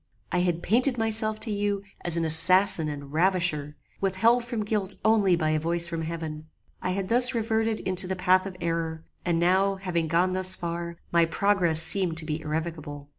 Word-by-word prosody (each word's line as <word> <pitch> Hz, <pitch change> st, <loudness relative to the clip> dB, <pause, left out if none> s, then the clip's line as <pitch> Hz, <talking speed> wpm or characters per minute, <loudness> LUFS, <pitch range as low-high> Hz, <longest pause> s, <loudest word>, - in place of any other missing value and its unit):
I 180 Hz, -, 0 dB
had 175 Hz, -1 st, -1 dB
painted 245 Hz, +5 st, +1 dB
myself 220 Hz, -1 st, 0 dB
to 220 Hz, 0 st, 0 dB
you 205 Hz, -1 st, -2 dB, 0.2 s
as 170 Hz, -1 st, 0 dB
an 165 Hz, -, 0 dB
assassin 160 Hz, +1 st, +2 dB
and 140 Hz, -1 st, -8 dB
ravisher, 165 Hz, -4 st, 0 dB, 0.2 s
withheld 225 Hz, +6 st, +2 dB
from 235 Hz, -3 st, -4 dB
guilt 205 Hz, -2 st, -2 dB
only 210 Hz, -5 st, +3 dB
by 155 Hz, -2 st, -1 dB
a 155 Hz, -, 0 dB
voice 170 Hz, +2 st, +1 dB
from 165 Hz, -1 st, -5 dB
heaven. 160 Hz, -1 st, -6 dB, 0.3 s
I -, -, -3 dB
had 190 Hz, +1 st, -3 dB
thus 250 Hz, +3 st, +6 dB
reverted 220 Hz, -1 st, -1 dB
into 185 Hz, 0 st, +2 dB
the 190 Hz, -, -3 dB
path 185 Hz, +1 st, +2 dB
of 185 Hz, -2 st, -9 dB
error, 165 Hz, -1 st, -3 dB, 0.2 s
and 170 Hz, -2 st, 0 dB
now, 190 Hz, +3 st, +2 dB
having 180 Hz, -4 st, -3 dB
gone 175 Hz, +3 st, +1 dB
thus 185 Hz, 0 st, +1 dB
far, 170 Hz, 0 st, -6 dB
my 170 Hz, -1 st, +3 dB
progress 170 Hz, -2 st, +2 dB
seemed 175 Hz, -2 st, +4 dB
to 160 Hz, -, +1 dB
be 155 Hz, 0 st, -4 dB
irrevocable. 155 Hz, -2 st, -6 dB
180 Hz, 185 wpm, -25 LUFS, 165-200 Hz, 0.3 s, thus